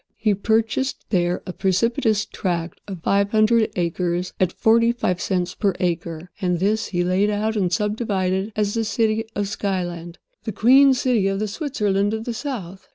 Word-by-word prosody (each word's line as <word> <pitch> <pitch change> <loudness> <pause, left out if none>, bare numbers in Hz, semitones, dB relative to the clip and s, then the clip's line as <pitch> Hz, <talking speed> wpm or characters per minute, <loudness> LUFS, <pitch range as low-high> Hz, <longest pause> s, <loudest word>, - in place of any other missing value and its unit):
He 215 -2 +2
purchased 225 +6 0
there 175 -2 +1
a 180 - -6
precipitous 215 +3 +1
tract 175 -3 -3
of 185 -5 -7
five 200 0 +2
hundred 220 +1 +3
acres 175 +1 -1
at 185 -2 +2
forty 230 +3 +3
five 180 -7 -1
cents 180 -2 -1
per 200 -4 0
acre; 170 -1 -3
and 180 -2 +1
this 210 +5 0
he 175 -2 -1
laid 185 +3 +2
out 215 +1 -1
and 185 -4 0
subdivided 205 -2 -1
as 205 -1 0
the 230 - 0
city 220 +1 0
of 205 0 -1
Skyland—the 180 -1 -5
Queen 265 +6 +6
City 245 -6 +1
of 195 0 0
the 215 +2 -1
Switzerland 205 - -1
of 220 - -5
the 240 - -3
South. 210 - -6
200 Hz, 165 wpm, -22 LUFS, 180-220 Hz, -, Queen